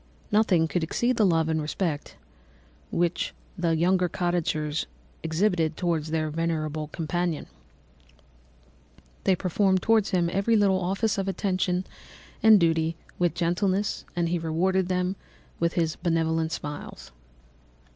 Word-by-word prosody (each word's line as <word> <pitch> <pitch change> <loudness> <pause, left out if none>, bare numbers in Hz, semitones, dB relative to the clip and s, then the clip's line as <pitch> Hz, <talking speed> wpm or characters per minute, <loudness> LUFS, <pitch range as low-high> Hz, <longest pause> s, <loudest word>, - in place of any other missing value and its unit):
Nothing 195 -6 +3
could 175 +2 -1
exceed 240 +9 0
the 215 - +4
love 165 -2 +2
and 160 -1 0
respect 155 0 -3 0.7
which 170 0 -1 0.2
the 170 -3 +1
younger 180 +2 +2
cottagers 160 -4 -1 0.3
exhibited 165 -1 +1
towards 165 -3 -1
their 155 -1 -1
venerable 155 -1 -2
companion. 165 +1 -2 1.8
They 190 - +4
performed 190 +1 +1
towards 225 -2 +3
him 180 -4 +2
every 200 +4 +2
little 195 -3 +3
office 195 +4 0
of 195 - -2
affection 185 -1 0 0.6
and 220 -2 +7
duty 165 -1 +2 0.2
with 175 -2 +1
gentleness, 185 +4 0
and 170 -1 +1
he 175 0 0
rewarded 175 +3 +1
them 180 +1 -1 0.4
by 170 - +3
his 165 -1 -1
benevolent 165 -2 0
smiles. 145 -2 -7
175 Hz, 125 wpm, -26 LUFS, 160-190 Hz, 1.8 s, and